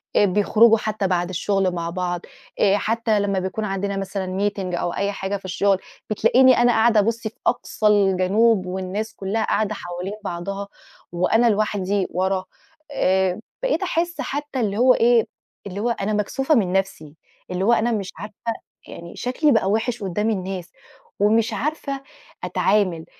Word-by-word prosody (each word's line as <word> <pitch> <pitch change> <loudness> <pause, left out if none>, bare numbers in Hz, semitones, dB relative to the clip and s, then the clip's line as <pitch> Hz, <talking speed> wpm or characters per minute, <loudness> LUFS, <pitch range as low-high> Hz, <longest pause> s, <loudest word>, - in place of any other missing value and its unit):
آآ - - +5
بيخرجوا 210 +4 +4
حتى 210 -2 -2
بعد 175 -1 0
الشغل 190 +1 0
مع 170 -1 -3
بعض، 175 0 -3 0.4
آآ 200 0 +4
حتى 220 0 0
لمّا 200 -1 0
بيكون 190 +4 -3
عندنا 195 0 -2
مثلًا 195 0 -2
meeting 185 -3 -4
أو 175 - -2
أي 200 0 -1
حاجة 195 0 -3
في 190 - -16
الشغل، 190 +1 +1 0.3
بتلاقيني 255 +4 +5
أنا 240 0 +4
قاعدة 225 -1 +4
أبصّ 230 +3 +1
في 220 - -5 0.2
أقصى 215 -3 0
الجنوب، 200 +1 +3
والناس 190 +4 -4
كلها 205 +3 -2
قاعدة 215 0 0
حوالين 180 +2 -6
بعضها، 195 +3 -4 0.4
وأنا 220 +7 +3
لوحدي 205 -2 0
ورا، 185 +1 0 0.5
آآ 190 -6 +1 0.2
بقيت - - +1
أحسّ 345 +1 -1
حتى 290 -1 -4
اللي 205 -4 -1
هو 250 +2 +6
إيه، 235 -1 +3 0.4
اللي 195 +1 -6
هو 235 +3 0
أنا 215 -2 -1
مكسوفة 265 +8 +1
من 190 -6 +1
نَفسي، 185 -6 -2 0.4
اللي 180 +1 -1
هو 235 - +5
أنا 235 +1 +2
مش 205 -4 -2
عارفة 210 +4 -8 0.5
يعني 170 0 -10
شكلي 270 +5 +1
بقى 225 -6 +2
وِحِش 225 +2 -1
قدام 210 +4 -1
الناس، 185 -3 -4 0.5
ومش 225 +2 +3
عارفة 275 +1 -3 0.4
أتعامل 190 -5 +1
200 Hz, 160 wpm, -22 LUFS, 185-225 Hz, 0.5 s, هو